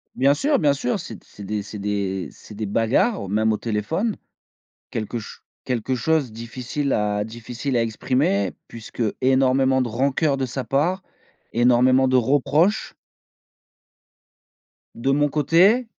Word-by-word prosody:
bien 135 +2 +4
sûr, 285 - +1
bien 145 -3 +3
sûr! 135 -3 -2
C'est - - -7
d - - -16
c'est 105 - -13
des 105 +1 -3
c'est 105 +1 -8
des 100 -2 -2
c'est 105 - -14
des 110 +1 -3
bagarres 115 - +1
au - - -6
même 110 +3 +1
au - - -1
téléphone. 120 - -2 0.8
Quelque 115 +2 -3
ch 105 - -10 0.2
quelque 125 0 -1
chose 135 0 0
difficile 125 +5 -4
à 105 -1 0
difficile 120 +4 -4
à 120 - +3
exprimer 110 -3 0 0.2
puisque 115 +1 -7 0.2
énormément 130 0 +3
de 125 - -2
rancœurs 135 +5 +1
de 135 -1 -1
sa 130 +1 -4
part, 155 - 0 0.5
énormément 125 +2 +4
de 130 - +3
reproches. 145 - +2 2.0
De 135 +4 0
mon 145 +1 +2
côté, 175 - +3
125 Hz, 145 wpm, -22 LUFS, 110-140 Hz, 2.0 s, bien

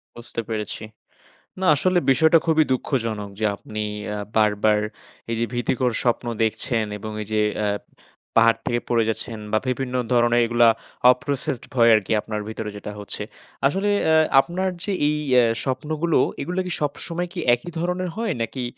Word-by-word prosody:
বুঝতে 120 0 -6
পেরেছি। 110 -1 -4 0.8
না 190 - -1
আসলে 180 +5 +2
বিষয়টা 160 +4 +5
খুবই 160 -1 +4
দুঃখজনক 115 -6 -1
যে 110 - +1
আপনি 105 +1 -8 0.4
আ - - -4 0.2
বারবার 105 0 +3 0.5
এই - - 0
যে 115 - +1
ভীতিকর 120 +1 0
স্বপ্ন 120 -1 +1 0.2
দেখছেন 110 0 0
এবং 110 +1 -7
এই 105 - -6
যে 105 - +3 0.2
অ্যা 105 - 0 0.7
পাহাড় 115 0 +5
থেকে 120 0 0
পড়ে 115 -2 +3
গেছেন 110 0 -4
বা 110 - +3
বিভিন্ন 130 0 -2 0.2
ধরনের 120 0 +4
এইগুলা 120 0 +4 0.4
অ - - +10
processed 140 -3 -2
ভয় 115 -2 +5
আরকি 105 -1 -1
আপনার 105 -1 -4
ভেতরে 110 -1 -5
যেটা 105 +1 -7
হচ্ছে। 105 +1 -5 0.4
আসলে 195 +7 0 0.2
অ্যা 160 - +4 0.2
আপনার 185 +5 0
যে 205 - -2 0.2
এই 150 0 +1 0.2
এ - - +5 0.2
স্বপ্নগুলো 155 +5 0 0.2
এগুলা 180 +5 -2
কি - - -4
সবসময় 170 +4 -2 0.3
একই 175 +9 -10
ধরনের 180 +1 -1
হয় 225 -6 -1
নাকি 125 +3 -3
120 Hz, 160 wpm, -23 LUFS, 110-155 Hz, 0.8 s, অ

